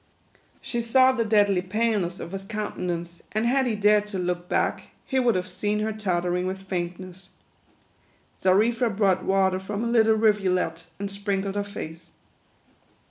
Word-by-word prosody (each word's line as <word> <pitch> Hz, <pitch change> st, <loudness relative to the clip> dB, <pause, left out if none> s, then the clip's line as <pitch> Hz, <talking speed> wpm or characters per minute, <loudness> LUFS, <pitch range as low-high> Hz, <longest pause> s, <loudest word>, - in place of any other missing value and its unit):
She 240 Hz, -2 st, -2 dB
saw 255 Hz, +3 st, +5 dB
the 245 Hz, -3 st, 0 dB
deadly 205 Hz, -4 st, +3 dB
paleness 200 Hz, -2 st, -1 dB
of 170 Hz, -, -7 dB
his 195 Hz, 0 st, -5 dB
countenance, 175 Hz, -5 st, -4 dB
and 215 Hz, +2 st, 0 dB
had 260 Hz, +2 st, +2 dB
he 225 Hz, -, 0 dB
dared 210 Hz, 0 st, +3 dB
to 205 Hz, -2 st, -5 dB
look 180 Hz, -1 st, -2 dB
back, -, -, 0 dB, 0.2 s
he 265 Hz, -, 0 dB
would 240 Hz, -4 st, +3 dB
have 180 Hz, 0 st, -1 dB
seen 210 Hz, 0 st, -1 dB
her 220 Hz, 0 st, -1 dB
tottering 180 Hz, -3 st, -1 dB
with 190 Hz, +1 st, -5 dB
faintness. 185 Hz, 0 st, -5 dB, 1.1 s
Xarifa 225 Hz, +6 st, +3 dB
brought 195 Hz, -3 st, +1 dB
water 190 Hz, -1 st, +2 dB
from 205 Hz, +3 st, -4 dB
a -, -, -1 dB
little 225 Hz, -2 st, +4 dB
rivulet, 185 Hz, -6 st, +1 dB
and 200 Hz, -, -3 dB
sprink 200 Hz, -1 st, -2 dB
led 195 Hz, -, -3 dB
her 205 Hz, 0 st, -1 dB
face. 165 Hz, -4 st, -9 dB
200 Hz, 160 wpm, -25 LUFS, 185-220 Hz, 1.1 s, saw